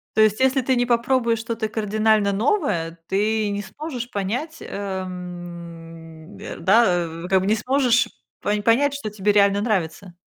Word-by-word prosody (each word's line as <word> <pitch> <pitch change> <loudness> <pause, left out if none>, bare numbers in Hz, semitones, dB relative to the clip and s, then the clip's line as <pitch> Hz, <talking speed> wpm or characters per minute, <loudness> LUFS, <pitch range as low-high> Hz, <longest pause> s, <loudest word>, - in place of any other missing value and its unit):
То 220 - +4
есть, 215 +1 +3
если 265 +1 +3
ты 260 +1 +1
не 245 0 +2
попробуешь 235 -1 +1
что-то 230 0 -3
кардинально 215 -1 +1
новое, 200 - 0
ты 210 +2 +1
не 200 0 -2
сможешь 245 +2 -6
понять, 245 - -3
ам, 175 -3 -7
а, - - -6
да, 180 -2 +3 0.2
в - - -5
как 190 0 +3
бы - - -2
не 215 - +3
сможешь 250 +1 +2 0.3
по 205 - -1
понять, 270 +6 +3
что 280 -6 -4
тебе 210 0 0
реально 200 0 +4
нравится. 190 -4 -2
210 Hz, 160 wpm, -22 LUFS, 185-235 Hz, 0.3 s, То